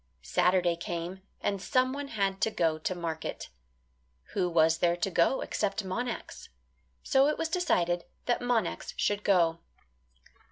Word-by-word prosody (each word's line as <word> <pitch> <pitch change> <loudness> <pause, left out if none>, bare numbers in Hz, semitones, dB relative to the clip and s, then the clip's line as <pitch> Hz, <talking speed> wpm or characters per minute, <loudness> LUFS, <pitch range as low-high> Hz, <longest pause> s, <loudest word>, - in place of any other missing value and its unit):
Saturday 180 -2 +2
came 170 +2 -5 0.2
and 200 -2 -1
someone 255 +7 0
had 195 -5 -1
to - - +3
go 165 -6 0
to 185 +4 -2
market. 165 -2 -4 0.8
Who 180 -3 +1
was 165 -1 +3
there 175 -1 +3
to 175 +2 -2
go 170 +10 +3
except 205 0 -2
Monax? 235 +5 -4 0.5
So 270 +1 +4
it 300 - 0
was 325 - -1
decided 175 - +1 0.2
that 240 - +1
Monax 240 -7 -1
should 205 0 0
go. 170 -4 +3
190 Hz, 135 wpm, -29 LUFS, 170-235 Hz, 0.8 s, So